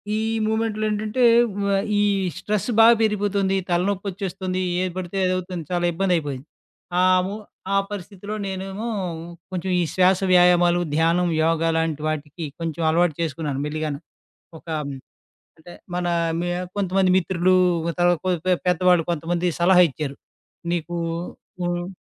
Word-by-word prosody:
ఈ - - 0 0.3
మూవ్‌మెంట్‌లో 220 -1 -1
ఏంటంటే, 215 +4 -1 0.4
వ 200 - 0 0.3
ఈ - - +3 0.4
స్ట్రెస్ 210 0 -2
బా 225 - +9 0.2
పెరిగిపోతుంది. 200 -2 +1
తలనోప్పోచ్చేస్తుంది. 185 0 -2 0.2
ఏది 185 -1 -1
పడితే 185 +1 -4
అదవుతుంది, 185 -2 -2
చాలా 175 0 0
ఇబ్బందయిపోయింది. 160 -7 -1 0.5
ఆము 185 +1 +3 0.4
ఆ - - +4
పరిస్థితిలో 205 +1 -7
నేనేమో, 195 +4 -5 0.6
కొంచెం 185 +1 -3
ఈ - - +2
శ్వాస 185 0 +4
వ్యాయామాలు, 175 -1 +5
ధ్యానం, 170 +2 +2 0.2
యోగ 165 0 +1 0.2
లాంటి 160 -2 -1
వాటికి, 155 +1 -4
కొంచెం 165 0 -4
అలవాటు 165 -1 +2
చేసుకున్నాను 145 -3 -2
మెళ్ళిగాను. 150 -1 -3 0.6
ఒక - - -28
ఆహ్, 140 -2 -5 0.6
అంటే, 175 +2 -13 0.2
మన 175 0 -1 0.3
మ్యా 175 +1 -2 0.2
కొంతమంది 190 -1 +2
మిత్రులు, 185 0 +2 0.4
తరవాత 175 -2 +3
కొ 185 - +2 0.2
పె 185 - +5
పెద్దవాళ్ళు 180 -1 +3
కొంతమంది 170 +2 -1
సలహా 180 0 +6
ఇచ్చారు. 140 -1 -5 0.6
నీకు 175 0 -3 0.7
హ్మ్. 175 0 -2
180 Hz, 125 wpm, -23 LUFS, 165-190 Hz, 0.7 s, బా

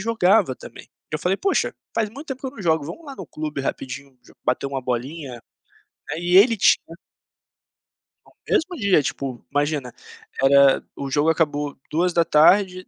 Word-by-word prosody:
jogava 200 - +2
também. - - -13 0.2
Eu 155 - -2
falei: 180 +5 0
"Poxa, 390 - 0 0.2
faz 225 -2 0
muito 280 +7 -10
tempo 265 -1 -5
que - - -5
eu - - -4
não 230 -6 -10
jogo. 160 -4 +1
Vamos 250 - -8
lá 275 - -8
no 190 - -9
clube 150 -2 -5
rapidinho 135 0 -6
jo - - -20
bater 125 +2 0
uma 135 -1 -3
bolinha?" 125 +1 -4 0.7
Aí 175 +2 0
ele 225 +4 +6
tinha 165 -3 +2 1.3
No - - -21 0.2
mesmo 355 +3 +1
dia, 200 - +3
tipo, 130 0 -4
imagina, 145 -3 -1 0.5
era 140 0 +5
o 140 -1 -5
jogo 145 +3 +2
acabou 150 -3 0
14h, 180 +3 +3
160 Hz, 160 wpm, -22 LUFS, 140-195 Hz, 1.3 s, ele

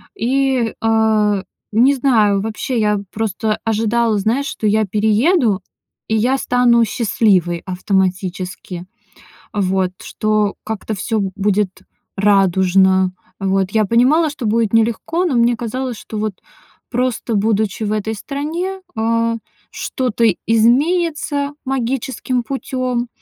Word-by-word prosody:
И, 260 -1 +1
а, 220 -3 +2 0.3
не 255 +6 +4
знаю, 215 -7 +3
вообще, 225 +3 -2
я 210 -1 +2
просто 215 0 -1
ожидала, 225 0 +1
знаешь, 240 +8 0
что 215 - -2
я 215 +1 +2
перееду, 215 - +2 0.5
и 220 - +2
я 255 +5 +2
стану 245 -2 +3
счастливой 185 -6 +1
автоматически. 185 -1 -2 0.7
Вот, 190 -2 0
что 215 -1 0
как-то 220 0 -4
всё 215 +3 -1 0.2
будет 200 -1 0 0.4
радужно. 190 -1 +3 0.3
Вот. 195 0 0
Я 220 -1 +2
понимала, 260 - +3
что 285 -5 -6
будет 225 0 +1
нелегко, 235 +10 +1
но 310 - 0
мне 235 0 +3
казалось, 245 +1 -4
что 215 - -8
вот 215 -2 -2 0.6
просто 245 -1 -1
будучи 215 0 0
в 210 - -1
этой 215 +1 -2
стране, 330 - -4
а, 230 +1 +1 0.3
что-то 235 -3 -1 0.2
изменится 285 +5 +2
магическим 260 -1 -2
путём, 255 -1 -2
220 Hz, 115 wpm, -18 LUFS, 205-250 Hz, 0.7 s, не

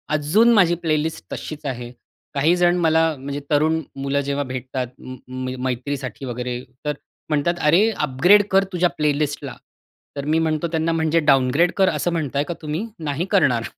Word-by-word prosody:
अजून 200 +11 +4
माझी 180 -6 +4
प्लेलिस्ट 160 0 -1
तशीच 155 -1 -7
आहे. 125 -3 -4 0.4
काही 155 +5 +3
जण 175 0 +3
मला 160 0 +4
म्हणजे 140 +2 -5
तरुण 155 +2 +2
मुलं 140 +1 -1
जेव्हा 140 0 -2
भेटतात 130 -1 -4
उंम, 130 - -8
उंम, 130 0 -5
मैत्रीसाठी 130 +1 -4
वगैरे 125 0 -4 0.3
तर 150 - 0 0.4
म्हणतात 155 +4 0
"अरे 190 +8 +5
अपग्रेड 175 +6 +4
कर 195 0 +5
तुझ्या 180 0 +2
प्लेलिस्टला." 145 -2 -1 0.6
तर 140 -1 -4
मी 160 - +3
म्हणतो 160 0 0
त्यांना 165 0 0
"म्हणजे 160 0 +2
डाउनग्रेड 145 +3 +3
कर 190 -1 +4
असं 175 - -1
म्हणताय 145 -4 -1
का 175 - -2
तुम्ही? 155 +8 -3
नाही 150 +2 -2
करणार." 140 - +3
150 Hz, 160 wpm, -21 LUFS, 135-165 Hz, 0.6 s, अरे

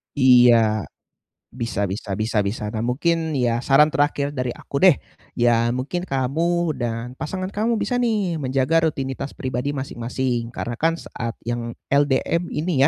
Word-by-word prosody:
Iya, 120 -5 +5 0.7
bisa 115 -4 -2
bisa 95 0 -4
bisa 110 +1 -1
bisa. 100 +2 -3
Nah, 110 - -2
mungkin 160 +5 0
ya 120 -1 +1
saran 150 +3 +4
terakhir 145 -1 +1
dari 125 -3 -2
aku 140 +3 -5
deh, 185 -6 +7 0.4
ya 120 -1 +3
mungkin 130 +8 -2
kamu 165 +3 0
dan 120 +1 -3
pasangan 185 +7 -4
kamu 225 +2 +1
bisa 245 - -2
nih 205 -9 0
menjaga 135 +5 +2
rutinitas 135 -1 -5
pribadi 130 +1 -2
masing-masing. 125 -3 -3
Karena 120 0 -5
kan 165 +1 +2
saat 115 -7 -6
yang 120 0 -3 0.2
LDM 145 +5 +2
ini 155 -2 0
130 Hz, 145 wpm, -22 LUFS, 120-155 Hz, 0.7 s, deh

